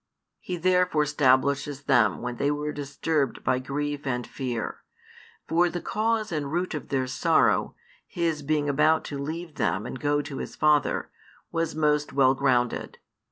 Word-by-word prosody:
He 180 - -5
therefore 180 -2 +2
stablishes 140 0 +1
them 120 -4 +3
when 125 -1 -4
they 140 - +1
were 150 +1 -2
disturbed 145 -1 -2
by 130 - +1
grief 145 +2 -3
and 125 -2 -1
fear. 125 -4 -4 0.7
For 175 +2 +3
the 175 - -4
cause 220 +1 -1
and 145 -3 -2
root 175 +2 -1
of 150 - -6
their 130 -2 0
sorrow, 130 +1 +2 0.3
His 165 -3 -1
being 150 0 0
about 155 +3 +3
to 140 - -5
leave 160 +2 -5
them 105 -1 0
and 125 - -6
go 145 +2 +1
to 145 -2 -7
His - - -6
Father, 150 -2 +2 0.4
was 165 -2 -1
most 150 -1 +1
well 135 -1 +5
grounded. 125 -3 0
145 Hz, 160 wpm, -26 LUFS, 135-160 Hz, 0.7 s, well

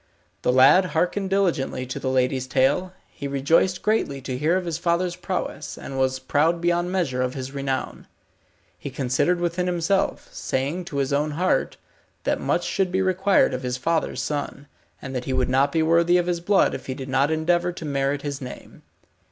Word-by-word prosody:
The - - +2
lad 135 +9 +6
hearkened 190 +2 0
diligently 170 -10 0
to 130 - -5
the 130 - -2
lady's 130 0 +1
tale. 140 +8 +1 0.2
He 140 - -7
rejoiced 150 +7 +2
greatly 210 -10 0
to 130 -1 -4
hear 155 +7 +2
of 185 - -3
his 165 -2 -3
father's 175 +1 0
prowess, 180 -4 -4
and 135 - -7
was 130 0 +1
proud 150 +6 +1
beyond 175 +1 0
measure 155 -10 0
of 130 +1 -1
his 130 0 -5
renown. 135 -1 -4 0.7
He - - -6
considered 135 +7 0
within 175 +1 -1
himself, 180 +2 0
saying 145 +7 -2
to 145 - -6
his 140 0 0
own 150 +2 +1
heart, 185 +2 +1 0.5
that - - 0
much - - 0
should 190 -2 0
be 190 +1 +1
required 190 -4 +3
of 130 - -3
his 125 -1 -2
father's 160 +5 -1
son, 145 -1 -4 0.4
and 130 - -6
that 125 - -3
he 130 - -2
would 130 -1 +1
not 135 +2 +3
be 160 +1 +2
worthy 170 +2 +4
of 175 - +1
his 175 -1 -1
blood 195 +3 +3
if - - -7
he 130 - -3
did 135 0 -7
not 135 +2 +2
endeavour 175 +3 +1
to 170 -2 -8
merit 140 0 -1
his 140 -1 -4
name. 125 -1 -10
150 Hz, 195 wpm, -24 LUFS, 135-175 Hz, 0.7 s, lad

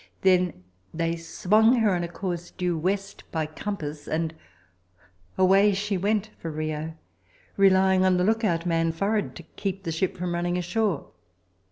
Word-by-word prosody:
Then 180 - +2 0.3
they 165 0 -1
swung 215 +8 +3
her 220 -5 +3
on 175 -1 0
a - - -2
course 175 0 -4
due 180 -2 -2
west 195 +4 -2
by 160 -1 -1
compass, 155 -3 -5
and 160 0 -1 1.0
away 195 +2 +5
she 205 +1 -1
went 210 +3 0
for 165 - -5
Rio, 155 +1 -4 0.6
relying 190 -1 +4
on 185 -1 +4
the 180 - +2
lookout 205 -5 +1
man 165 -1 +1
forward 200 +5 -1
to 170 - -9
keep 195 +3 -5
the 165 - -3
ship 185 +4 -1
from 180 -1 -2
running 175 +1 -1
ashore. 180 -2 -1
180 Hz, 155 wpm, -26 LUFS, 165-195 Hz, 1.0 s, away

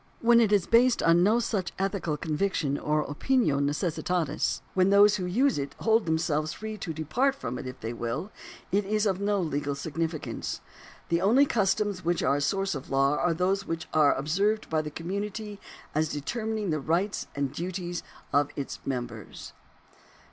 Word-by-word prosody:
When 235 0 +6
it 220 -3 +3
is 200 -4 +3
based 240 +1 +4
on 165 +1 +5
no 210 +5 +4
such 205 -6 -2
ethical 190 -5 -1
conviction 155 -2 -1
or 150 +1 0
opinio 150 - +1
necessitatis 155 +1 -1
— - - -32
when 185 0 +3
those 205 +1 +6
who 180 -2 -3
use 250 - +2
it 140 0 -5
hold 225 -3 +3
themselves 160 -1 0
free 220 0 -6
to 175 - -4
depart 195 - 0
from 275 - -5
it 130 - -6
if 130 0 -8
they 115 +1 -4
will 120 - -4 0.2
— - - -19
it 200 +2 +2
is 215 +2 0
of 195 -2 0
no 205 0 +1
legal 145 -4 -1
significance. 160 +2 -3 0.5
The 170 0 +2
only 240 +9 +5
customs 205 -4 0
which 170 +1 0
are 140 - +3
a - - -2
source 195 +6 0
of 135 -3 -7
law 135 +1 +3
are 175 -2 +1
those 195 +3 0
which 165 +1 -3
arc 150 -2 +4
observed 195 +10 0
by 160 -1 +2
the 150 - -5
community 200 +6 -5 0.3
as 155 +1 +1
determining 215 - -2
the 155 - 0
rights 170 +8 -1
and 140 -2 -2
duties 175 0 -4 0.3
of 145 0 +3
its 140 - -5
members. 120 -5 -5
175 Hz, 180 wpm, -28 LUFS, 150-205 Hz, 0.5 s, When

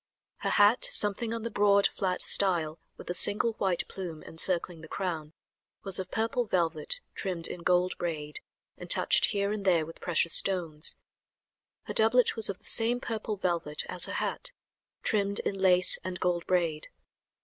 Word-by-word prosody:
Her - - -3
hat, 205 +4 +4
something 210 +2 +1
on 230 -1 -4
the 230 - -4
broad, 200 -1 +3
flat 185 -2 0
style 170 -5 +1 0.2
with - - -12
a - - -2
single 210 +5 +1
white 185 -3 -1
plume 175 -5 -8
encircling 170 0 -2
the 160 - -11
crown, 160 -4 -5 0.5
was 195 -2 +3
of 185 -1 -5
purple 225 +3 -1
velvet 170 - -1
trimmed 180 -4 -4
in 175 - -5
gold 180 +1 +1
braid 150 -4 -5 0.4
and - - -9
touched - - +3
here 200 -1 -1
and 210 -1 -4
there 175 -5 +2
with 165 - -13
precious 170 -1 +2
stones. 165 -5 +2 0.9
Her - - -6
doublet 230 +3 +4
was 225 -2 0
of 195 - -4
the - - -30
same 235 +1 +6
purple 220 -3 -4
velvet 170 -5 -2
as 180 - 0
her - - -6
hat, - - -4 0.5
trimmed 200 -1 0
in 195 - -4
lace 180 -1 +4
and 185 -1 -5
gold 175 -2 -1
braid. 170 -4 0
185 Hz, 170 wpm, -28 LUFS, 170-205 Hz, 0.9 s, same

